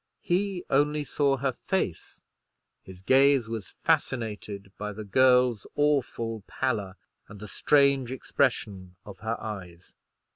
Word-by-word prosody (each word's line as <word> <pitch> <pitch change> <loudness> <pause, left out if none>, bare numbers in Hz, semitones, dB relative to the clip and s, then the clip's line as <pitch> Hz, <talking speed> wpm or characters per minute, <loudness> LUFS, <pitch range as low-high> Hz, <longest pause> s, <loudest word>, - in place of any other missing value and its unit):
He 185 0 -1
only 150 +2 +2
saw 140 -1 +1
her 135 +1 0 0.2
face; 190 - -2 0.6
his 95 0 -13
gaze 135 +1 +4
was 110 -5 -5
fascinated 105 -5 -2
by 105 0 -4
the 110 +2 -7
girl's 125 +1 +3
awful 125 -6 0
pallor, 105 -8 -2 0.3
and 100 - -12
the 105 - -8
strange 140 +1 +2
expression 105 -9 -1
of 100 -2 -11
her 110 +2 -3
eyes. 90 -5 -8
115 Hz, 120 wpm, -27 LUFS, 100-140 Hz, 0.6 s, gaze